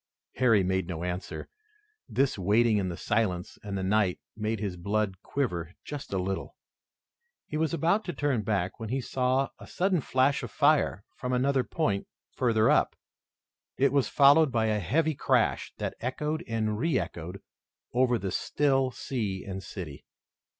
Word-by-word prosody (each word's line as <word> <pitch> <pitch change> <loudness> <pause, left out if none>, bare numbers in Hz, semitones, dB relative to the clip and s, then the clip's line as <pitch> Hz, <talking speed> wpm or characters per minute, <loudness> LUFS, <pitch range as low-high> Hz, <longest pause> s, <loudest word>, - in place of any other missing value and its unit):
Harry 115 -6 +4
made 95 -1 0
no 85 -2 -4
answer. 90 +1 -4 0.6
This 135 0 +1
waiting 105 +4 +3
in 95 -2 0
the 85 - -5
silence 95 -3 -1
and 100 -1 -4
the 95 - -2
night 95 -1 +2 0.2
made 110 0 -2
his 100 -4 -3
blood 100 +1 -1
quiver 90 - -2
just 145 -1 -6
a 95 - 0
little. 95 +1 -3 0.9
He - - -6
was 155 0 +1
about 170 +6 +2
to 175 - -3
turn 145 -7 0
back 100 -3 -1
when 110 -1 -5
he 130 +3 0
saw 130 +1 +1
a - - -11
sudden 185 -3 +1
flash 130 +2 +2
of - - -5
fire 145 -8 +2
from 125 0 -2
another 130 +1 +2
point 105 -12 -1 0.2
further 115 -3 +2
up. - - +3 0.8
It 135 0 +3
was 140 -2 +3
followed 145 +1 +6
by 115 -2 +1
a 105 -1 +1
heavy 155 - +1
crash - - +1
that - - -3
echoed 150 +6 -2
and 110 -2 -1
re 165 +5 +2
echoed 85 +4 -4 0.5
over 125 -1 +3
the 95 -4 -3
still 135 +4 +1
sea 110 -7 -3
and 95 -1 -5
city. 90 -7 -8
115 Hz, 165 wpm, -28 LUFS, 95-135 Hz, 0.9 s, followed